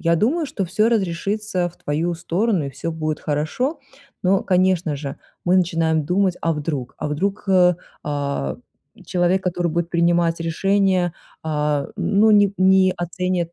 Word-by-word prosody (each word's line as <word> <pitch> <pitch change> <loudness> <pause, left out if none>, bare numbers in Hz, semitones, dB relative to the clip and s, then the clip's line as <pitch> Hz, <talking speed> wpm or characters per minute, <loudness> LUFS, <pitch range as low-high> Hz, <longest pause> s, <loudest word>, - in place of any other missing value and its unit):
Я 170 0 +2
думаю, 300 - +1
что 200 -7 -3
всё 210 +6 +1
разрешится 195 -2 -1
в 175 - -18
твою 165 +4 -2
сторону, 180 +1 0
и - - -5
всё 140 +5 -5
будет 155 -1 -3
хорошо. 155 - -1 0.5
Но, 190 +1 +3
конечно 180 -5 +1
же, 140 -1 -6 0.3
мы 180 +1 +3
начинаем 165 -3 +1
думать: 180 +2 +1
"А 165 - +2
вдруг?" 145 -4 -4
А - - -3
вдруг, 195 +8 -2
э, 180 -2 +5 0.3
а, 140 - -2 0.5
человек, 180 +1 +1
который 175 -1 0
будет 170 +1 -2
принимать 170 -1 +2
решения, 185 +1 +1 0.3
а, 150 -2 0
ну, 215 +2 +3
не 205 -1 +5
не 190 0 +5
оценит. 175 0 -2
175 Hz, 150 wpm, -21 LUFS, 160-190 Hz, 0.5 s, э